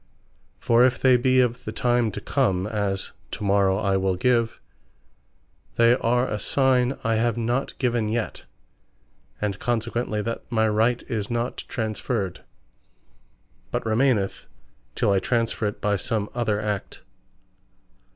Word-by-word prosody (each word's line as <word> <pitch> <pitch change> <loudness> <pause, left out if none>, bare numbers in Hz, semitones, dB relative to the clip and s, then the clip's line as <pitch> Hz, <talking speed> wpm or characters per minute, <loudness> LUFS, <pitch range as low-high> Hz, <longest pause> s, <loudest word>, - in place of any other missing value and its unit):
For 120 +1 +4
if 125 0 +3
they 130 -1 +5
be 130 +1 +3
of 125 0 -1
the - - -5
time 120 -2 +1
to - - -4
Come, 95 -1 0
as, 100 -2 -2 0.2
To - - -5
Morrow 100 -1 +3
I 100 -2 +1
Will 95 -1 0
Give, 115 +3 +1 1.2
they 115 0 +5
are 125 +1 +1
a 105 - -3
signe 130 +2 +2
I 115 -2 +1
have 115 0 +1
not 120 +3 -1
given 120 -4 0
yet, 115 0 -3 0.9
and 100 -2 -2
consequently 115 -2 -1
that 115 +1 -3
my 110 -1 +2
right 110 +3 +1
is 105 -3 -4
not 120 +1 -3
transferred, 110 -3 -3 1.3
but - - -3
remaineth 110 -3 +1 0.5
till - - +2
I 100 - +3
transferre 115 +1 0
it 105 - -5
by 105 -1 +1
some 105 +2 -2
other 110 -4 0
Act. 105 -2 -4
115 Hz, 140 wpm, -24 LUFS, 105-120 Hz, 1.3 s, they